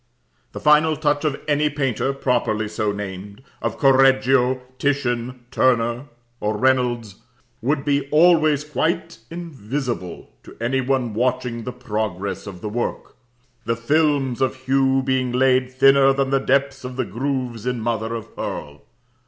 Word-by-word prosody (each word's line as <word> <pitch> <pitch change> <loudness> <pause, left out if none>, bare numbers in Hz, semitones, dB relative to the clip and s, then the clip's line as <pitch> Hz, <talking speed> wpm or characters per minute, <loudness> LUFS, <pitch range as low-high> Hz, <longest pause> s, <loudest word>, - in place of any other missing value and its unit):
The - - -6
final 155 +1 +4
touch 145 -1 0
of 145 -2 -1
any 150 0 +2
painter 135 -3 -1
properly 125 -5 0
so 105 0 -1
named, 100 +2 -7 0.2
of - - -2
Correggio 130 -2 +4 0.2
Titian 125 -3 -1
Turner 120 -1 +1 0.3
or 105 0 -1
Reynolds 120 -4 +1 0.4
would 140 +4 0
be 140 -1 0
always 155 -2 +4
quite 160 +2 -2
invisible 135 - -5
to - - -14
any 125 +3 0
one 130 -3 -1
watching 125 0 -1
the 125 - -3
progress 105 -6 -4
of 90 -3 -9
the 105 - -4
work, 120 +3 -4 0.5
the 115 - 0
films 140 0 +1
of 130 - +1
hue 135 0 +2
being 130 -1 0
laid 130 0 +2
thinner 135 +1 +5
than 135 0 -1
the 135 - +3
depths 135 0 0
of 125 0 -6
the 130 -1 -1
grooves 125 0 -3
in 125 -1 -1
mother 115 0 -2
of 115 - -8
pearl. 75 0 -6
130 Hz, 145 wpm, -22 LUFS, 115-140 Hz, 0.5 s, thinner